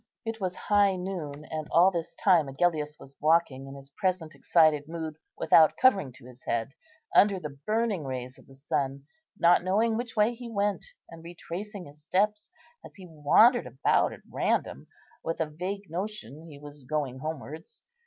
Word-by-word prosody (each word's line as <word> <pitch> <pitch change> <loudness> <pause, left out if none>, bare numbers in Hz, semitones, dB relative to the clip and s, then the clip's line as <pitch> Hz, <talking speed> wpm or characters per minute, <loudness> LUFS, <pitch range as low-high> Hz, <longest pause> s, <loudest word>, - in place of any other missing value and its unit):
It 225 -1 -5
was 185 -1 -2
high 205 -2 +2
noon; 165 -6 -5
and 155 -1 -4
all 175 +4 +5
this 170 -3 -5
time 175 -7 +3
Agellius 150 +1 -1
was 135 0 -14
walking 150 -4 +2
in 135 - -9
his 135 0 -13
present 180 -1 -2
excited 155 -3 +3
mood, 160 -1 -5 0.2
without 160 -1 +5
covering 200 - +3
to 130 - -16
his 125 0 -15
head, 115 +3 -2 0.4
under 200 -2 +5
the 150 -4 -7
burning 215 -5 0
rays 130 -1 -6
of - - -20
the 135 - -16
sun, 135 0 -2 0.3
not 175 -1 +4
knowing 220 +5 +1
which 240 0 -5
way 215 +2 +3
he 240 0 -9
went, 205 -2 -1 0.3
and 165 -1 -12
retracing 180 +3 -7
his 145 +1 -16
steps, 210 +6 0 0.3
as - - -13
he 190 -2 -12
wandered 175 - +4
about 130 +3 +1
at - - -11
random, - - -1 0.4
with 165 - -3
a 160 - +1
vague 185 +6 -5
notion 170 - -6
he 150 -3 -11
was 145 -1 -12
going 135 -2 -2
homewards. 155 +2 -8
165 Hz, 175 wpm, -28 LUFS, 145-195 Hz, 0.4 s, all